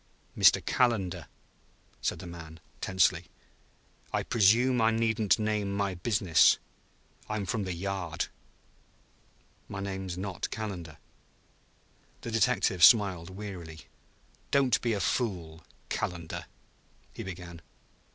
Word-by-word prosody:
"Mr. - - +5
Calendar?" 95 - +1 0.7
said - - -1
the - - -9
man 80 -2 -10 0.2
tensely. 95 -2 +2 0.9
"I - - 0
presume 120 +3 +4
I 110 - +5
needn't 110 -4 +2
name 105 -2 -1
my 100 -1 -1
business. 90 -2 +4 0.7
I'm 105 -2 -2
from 105 +1 -2
the 90 - -3
Yard 95 -2 -3 0.7
" - - -35
"My 100 - -5
name 95 -1 -4
is 90 -1 -5
not 95 -1 -4
Calendar." 90 -8 -6 1.2
The 115 - -6
detective 110 -6 +2
smiled 95 -4 +6
wearily. 95 -5 -8 0.7
"Don't 130 -4 +3
be 120 -2 0
a 105 - -1
fool, 90 -8 -2 0.3
Calendar," 85 -3 -4 0.7
he - - -7
began. 85 -2 -8
95 Hz, 110 wpm, -29 LUFS, 85-110 Hz, 1.2 s, smiled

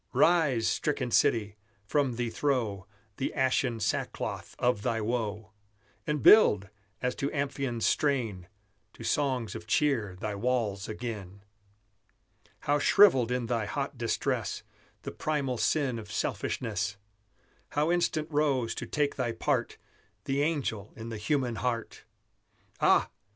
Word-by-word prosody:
Rise, 150 -10 +3
stricken 130 -5 -1
city! 105 -2 +2 0.3
from 135 +2 +1
thee 120 -1 -2
throw 115 -10 -1 0.3
The 135 - -1
ashen 130 -3 +1
sackcloth 105 - -3
of 120 -4 +1
thy 115 +2 0
woe; 110 -2 -2 0.6
And 150 -2 -1
build, 105 - +7 0.3
as 125 0 +1
to 140 - -1
Amphion's 135 -4 -2
strain, 115 -11 0 0.5
To - - -11
songs 130 -7 0
of 110 -1 -8
cheer 115 -7 +1
thy 105 0 -3
walls 105 -3 -1
again! 105 -4 -6 1.2
How 145 +1 +1
shrivelled 135 - +5
in 125 -1 0
thy 115 -2 -1
hot 140 +3 -3
distress 115 -1 -2 0.4
The - - -5
primal 140 -6 -2
sin 135 -6 +1
of 105 -2 -10
selfishness! 105 -4 -2 0.8
How 150 +3 +2
instant 165 -3 +1
rose, 140 -6 +1
to - - -6
take 145 -1 0
thy 125 -3 0
part, 115 - -1 0.5
The 135 +1 0
angel 135 -10 -1
in 115 +1 -7
the 115 - -5
human 125 0 0
heart! 115 0 -3 0.7
Ah! - - +4
120 Hz, 130 wpm, -29 LUFS, 110-140 Hz, 1.2 s, build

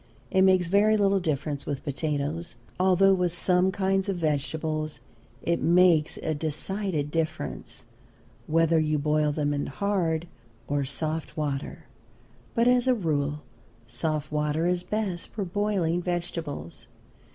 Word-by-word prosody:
It 190 - +4
makes 185 -2 +4
very 210 +4 +4
little 200 -1 +3
difference 150 -4 -2
with 140 -2 -3
potatoes, 150 +3 -3 0.2
although 190 +1 +5
with 180 -2 +1
some 180 +1 +2
kinds 195 0 0
of 195 - 0
vegetables 155 0 -2 0.4
it 170 0 0
makes 170 -2 +4
a 160 - 0
decided 155 +1 -2
difference, 160 -1 -3 0.6
whether 165 +1 +3
you 155 -1 +1
boil 150 +1 +1
them 145 -1 0
in 145 0 -2
hard 175 -1 -1 0.4
or 145 -1 0
soft 155 +4 -3
water. 145 -2 -3 0.7
But 235 0 +3
as 250 0 +4
a 255 - +4
rule 150 -6 -1 0.4
soft 150 +5 -3
water 150 +2 0
is 180 0 +1
best 200 -4 -3
for 205 -3 -4
boiling 185 -3 0
vegetables. 170 - -4
165 Hz, 130 wpm, -27 LUFS, 150-190 Hz, 0.7 s, although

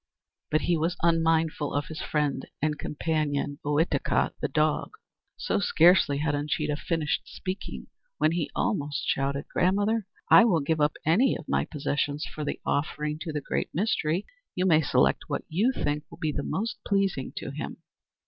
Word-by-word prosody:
But 155 - +2
he 175 - +2
was 165 +3 0
unmindful 165 -3 +2
of 145 0 0
his 160 0 -7
friend 150 -2 -1
and 150 0 -1
companion, 150 -2 -1
Ohitika, 150 +3 +1
the - - +1
dog! - - 0 0.4
So, - - 0
scarcely 170 -5 +5
had 145 +1 0
Uncheedah 150 0 -1
finished 160 -2 -1
speaking, 185 +1 -6 0.3
when 155 - +3
he 165 -3 -1
almost 145 0 -1
shouted: 140 +1 0
"Grandmother, 205 +3 +2 0.2
I - - +8
will 175 -9 +3
give 155 +2 0
up 150 +1 +2
any 210 - +3
of 160 - -12
my - - +1
possessions 145 0 -2
for 155 - -6
the 145 - -3
offering 150 +1 -1
to 165 -1 -4
the 150 -1 -3
Great - - -2
Mystery! 185 -2 0 0.3
You 185 - +1
may 160 -4 +5
select 145 - +2
what - - -2
you 205 +11 +2
think 150 - -2
will - - -12
be 155 -2 -1
most 200 +10 -2
pleasing 195 -9 0
to - - -5
him." - - -6
155 Hz, 165 wpm, -27 LUFS, 145-175 Hz, 0.4 s, I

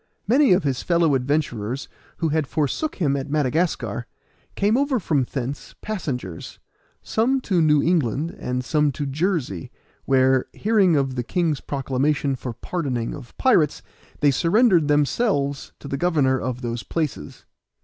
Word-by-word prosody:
Many 265 +3 +4
of 180 - +2
his 135 -3 -1
fellow 170 -3 +2
adventurers 130 -3 -1 0.3
who 165 - 0
had 155 -2 0
forsook 155 - -1
him 145 -7 +1
at 140 +1 -4
Madagascar, 155 +4 0 0.5
came 205 +3 +2
over 275 -1 +1
from 145 - 0
thence 135 +1 -5
passengers, 130 - -5 0.5
some 255 +5 +1
to 185 -8 +1
New 150 -2 +4
England, 160 - 0
and 125 0 -3
some 150 +1 +2
to 145 - -3
Jersey, 140 - -2 0.4
where, 130 -1 +3
hearing 200 -6 +3
of 135 -2 +1
the 125 -1 -2
king's 160 0 0
proclamation 140 +1 0
for 125 -1 -5
pardoning 125 -3 -3
of 140 -5 -11
pirates, 170 - +3 0.4
they 145 -1 +5
surrendered 175 - +3
themselves 145 - +1
to - - -10
the 140 - -2
governor 145 -6 +2
of 130 -1 -4
those 120 -1 -3
places. 155 -4 -4
145 Hz, 145 wpm, -23 LUFS, 130-175 Hz, 0.5 s, they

